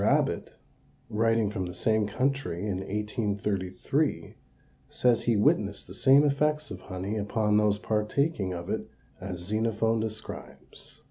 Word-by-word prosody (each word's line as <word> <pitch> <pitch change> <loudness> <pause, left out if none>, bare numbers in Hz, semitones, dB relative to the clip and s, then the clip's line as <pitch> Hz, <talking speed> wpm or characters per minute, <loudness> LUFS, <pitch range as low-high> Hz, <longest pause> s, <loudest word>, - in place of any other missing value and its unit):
Abbott, - - +1 0.6
writing 115 -1 +2
from 95 -4 -3
the 90 - -7
same 110 +3 +1
country 130 -5 -1
in 100 -3 -1
1833, 100 -2 -1 0.6
says 125 -2 +2
he 115 - +3
witnessed 100 0 +2
the 90 - -11
same 135 +7 +5
effects 150 0 +1
of 95 - -6
honey 95 +4 -4
upon 105 0 +1
those 105 -1 +3
partaking 105 - 0
of 85 -1 -5
it - - -3 0.3
as 90 -1 -5
Xenophon 110 +3 0
describes. 110 0 -7
105 Hz, 130 wpm, -28 LUFS, 100-115 Hz, 0.6 s, same